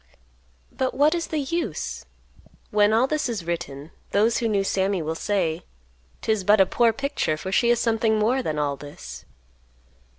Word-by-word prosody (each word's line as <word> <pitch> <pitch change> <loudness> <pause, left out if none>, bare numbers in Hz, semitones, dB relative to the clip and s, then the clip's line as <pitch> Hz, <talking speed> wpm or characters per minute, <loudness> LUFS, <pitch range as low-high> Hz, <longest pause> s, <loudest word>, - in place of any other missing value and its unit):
But 260 -1 -1
what 295 +3 +4
is 340 -1 -2
the 315 - -3
use? 330 +5 -3 0.7
When 210 0 +4
all 225 +3 +4
this 300 -1 -1
is 210 -8 -4
written, 165 -3 -5 0.2
those 220 +3 +3
who 230 - 0
knew 205 -3 +1
Sammy 195 0 0
will 160 +1 -2
say, 170 -2 -1 0.6
"'Tis 220 -3 +1
but 205 +2 +5
a 190 - +7
poor 230 +4 +3
picture, 275 - -1
for 190 +4 -5
she 235 +4 +3
is 240 -1 +3
something 225 -2 +2
more 235 +5 +2
than 155 -11 -3
all 145 -1 0
this." 145 +1 -10
210 Hz, 170 wpm, -24 LUFS, 175-240 Hz, 0.7 s, a